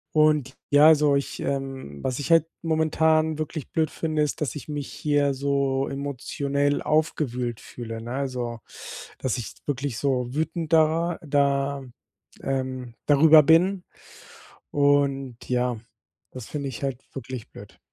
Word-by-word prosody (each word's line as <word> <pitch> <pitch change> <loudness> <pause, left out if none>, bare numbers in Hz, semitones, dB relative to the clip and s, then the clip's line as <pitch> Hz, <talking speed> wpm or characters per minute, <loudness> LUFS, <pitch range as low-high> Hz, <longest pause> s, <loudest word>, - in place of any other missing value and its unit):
Und 150 -4 +3
ja, 145 +2 +7
also 150 -2 +5
ich, 140 - -2
ähm 135 - -4
was 130 +1 -2
ich 145 - -3
halt 165 -1 +6 0.2
momentan 160 -1 +2
wirklich 155 -1 -5
blöd 160 -1 +1
finde, 155 -2 -2
ist, 150 +1 -1
dass 140 -7 -2
ich 150 - -8
mich 145 -2 -5
hier 145 -2 +1
so 135 0 0
emotionell 140 +1 -1
aufgewühlt 125 -6 -1
fühle, 115 -2 -7
ne? 120 +1 -7
Also, 125 -3 -3 0.6
dass 130 -2 -1
ich 120 - -6
wirklich 135 -4 -2
so 130 -3 0
wütend 160 +1 -2
da 165 +2 +3
da 140 -1 +1 0.6
ähm, 130 -2 -3
darüber 155 +2 +7
bin 175 +5 +4 0.9
und 140 -3 +2
ja, 125 -1 +1 0.5
das 125 -4 -8
finde 145 -2 -4
ich 130 +2 -7
halt 135 -2 -2
wirklich 130 -3 -7
blöd. - - -13
140 Hz, 135 wpm, -25 LUFS, 130-155 Hz, 0.9 s, ja